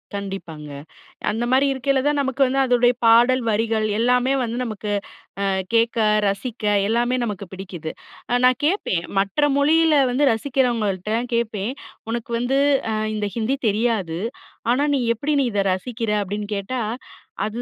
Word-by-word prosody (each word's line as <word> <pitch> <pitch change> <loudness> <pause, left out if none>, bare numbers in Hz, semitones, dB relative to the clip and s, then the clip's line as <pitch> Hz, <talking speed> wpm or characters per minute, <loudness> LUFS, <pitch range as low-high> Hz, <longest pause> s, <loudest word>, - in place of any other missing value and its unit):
கண்டிப்பாங்க. 180 -7 -6 0.6
அந்தமாரி 245 +5 +2
இருக்கயில 270 0 0
தான் 295 0 +2
நமக்கு 270 0 0
வந்து 270 +2 0
அதோடைய 245 -1 +4
பாடல் 240 +3 +5
வரிகள் 220 0 +1
எல்லாமே 250 +2 +2
வந்து, 235 0 -3
நமக்கு 215 -2 -5 0.5
அ - - +1 0.3
கேட்க 230 +1 +2 0.3
ரசிக்க 215 +3 -4 0.2
எல்லாமே 240 +3 +1
நமக்கு 200 -2 -5
பிடிக்குது. 180 -4 -6 0.4
அ - - +2
நான் 255 0 +4
கேட்பேன். 300 - 0 0.2
மற்ற 195 +4 -2 0.2
மொழியில 320 +2 +4 0.2
வந்து 275 +4 +1
ரசிக்கிறவங்கள்ட்டலாம் 230 -3 -1
கேட்பேன். 225 0 -1 0.4
உனக்கு 235 0 -4
வந்து 265 +3 +1 0.3
அ - - -1 0.2
இந்த 205 -1 -2
ஹிந்தி 245 +5 0
தெரியாது. 205 -6 -1 0.5
ஆனா, 260 +4 +3
நீ - - +1 0.2
எப்படி 285 +7 -2
நீ - - +3
இத 205 - 0
ரசிக்கிற? 230 +3 -4
அப்பிடின்னு 205 +2 -4
கேட்டா, 245 +6 -3 0.7
அது 220 +3 -4
235 Hz, 140 wpm, -22 LUFS, 205-255 Hz, 0.7 s, பாடல்